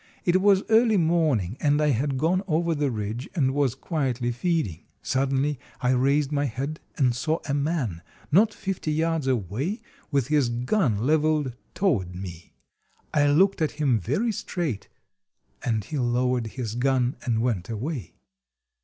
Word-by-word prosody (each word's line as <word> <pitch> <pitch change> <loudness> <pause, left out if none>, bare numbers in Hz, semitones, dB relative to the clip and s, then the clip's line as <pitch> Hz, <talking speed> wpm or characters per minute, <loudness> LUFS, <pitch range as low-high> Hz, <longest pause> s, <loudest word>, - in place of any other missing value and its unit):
It 185 +1 +3
was 195 -1 +4
early 225 -1 +4
morning, 155 - +1
and 145 0 +2
I 150 0 +3
had 135 +1 0
gone 170 +7 +2
over 170 0 +1
the 145 -2 0
ridge 110 +2 -4
and 135 -6 +2
was 140 -4 +1
quietly 130 -6 -1
feeding. 120 - -2 0.2
Suddenly 135 +1 0 0.2
I 125 - +1
raised 140 +3 +2
my 145 -1 +1
head 140 +5 -4 0.2
and 125 -4 +2
saw 155 +6 0
a 140 - -1
man, 140 - -1 0.3
not 210 +8 +5
fifty 190 -6 -3
yards 160 -2 0
away, 130 - -1 0.3
with 140 -5 +1
his 145 -5 +3
gun 120 - 0
leveled 155 -3 +2 0.2
toward 105 - 0
me. 90 -2 -8 0.6
I 145 -2 +4
looked 185 +6 +3
at 155 - +1
him 140 -7 +1
very 145 - 0
straight, 165 - -3 0.8
and 110 -3 0
he 145 +7 -4
lowered 125 -1 +1
his 115 -4 -3
gun 125 +1 +1
and 115 -5 0
went 110 -7 -1
away. 120 +3 -4
140 Hz, 155 wpm, -25 LUFS, 120-160 Hz, 0.8 s, not